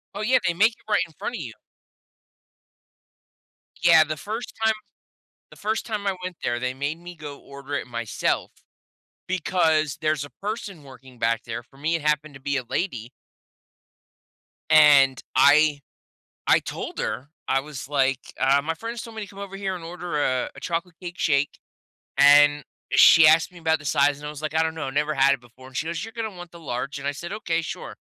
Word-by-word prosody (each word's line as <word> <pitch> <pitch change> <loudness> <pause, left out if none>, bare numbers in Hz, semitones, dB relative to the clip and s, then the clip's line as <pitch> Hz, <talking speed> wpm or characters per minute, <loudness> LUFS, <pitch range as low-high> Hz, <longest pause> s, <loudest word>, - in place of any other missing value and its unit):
Oh, 205 - -4
yeah. 245 +4 +3
They 175 - +2
make 215 +7 +4
it 220 - -23
right 175 - +4
in 165 - -18
front 245 - -4
of - - -5
you. 120 -6 -7 2.3
Yeah. 165 -2 +7
The 155 0 -4
1st 215 +10 -5
time 220 0 +4 0.8
the - - -15
1st 220 +2 -2
time 210 -3 -3
I 195 -1 0
went 180 -1 -5
there, 120 -1 0
they 125 +1 -2
made 145 +4 -3
me 175 +1 -10
go 150 -3 -9
order 140 +1 -9
it - - -2
myself, 115 -2 -2 0.8
because 160 -5 +1
there's 155 -2 0
a 145 - -9
person 200 -5 -5
working 130 -2 -15
back 115 +1 +1
there 115 -1 -5
for 135 +3 -23
me, 160 +4 0
it 165 - -2
happened 150 0 0
to - - -11
be 140 +1 -2
a 130 - -2
lady. 125 - -3 1.6
And 145 -4 +6
I 145 +2 +5 0.7
I - - +6
told - - -6
her. 135 +3 -3 0.2
I 135 - +2
was, 135 -1 -8
like, 135 -2 +2 0.2
"Uh, 135 +1 +4
my 165 +2 -1
friends 230 +7 -6
told 230 -1 -10
me 220 - -5
to 205 - -6
come 195 - -15
over 200 -1 -7
here 195 -1 -3
and 175 - -8
order 175 -2 -4
a 130 -1 0
a - - -10
chocolate 170 0 -3
cake 175 -1 -8
shake." 145 -1 +1 0.6
And 145 +1 +6 0.3
she 165 -1 +8
asked 160 +3 +5
me 180 - -13
about 160 -1 +1
the 150 - -14
size, 145 0 +2
and 150 - -8
I - - -4
was, 150 0 -9
like, 155 -1 -3
"I 160 - +3
don't 160 0 -2
know, 160 - -4
I - - -3
never 150 +2 0
had 135 0 +4
it 135 - -8
before." 120 +2 -16
And 130 - -11
she 155 - -1
goes, 165 0 -3
"You're 225 - -9
gonna 225 -3 -4
want 175 -1 -10
the 170 - -13
large." 140 -1 -4
And 140 - -7
I 145 - 0
said, 170 +6 -7
"Okay. 170 -6 -1
Sure." - - -7
155 Hz, 210 wpm, -24 LUFS, 140-175 Hz, 2.3 s, she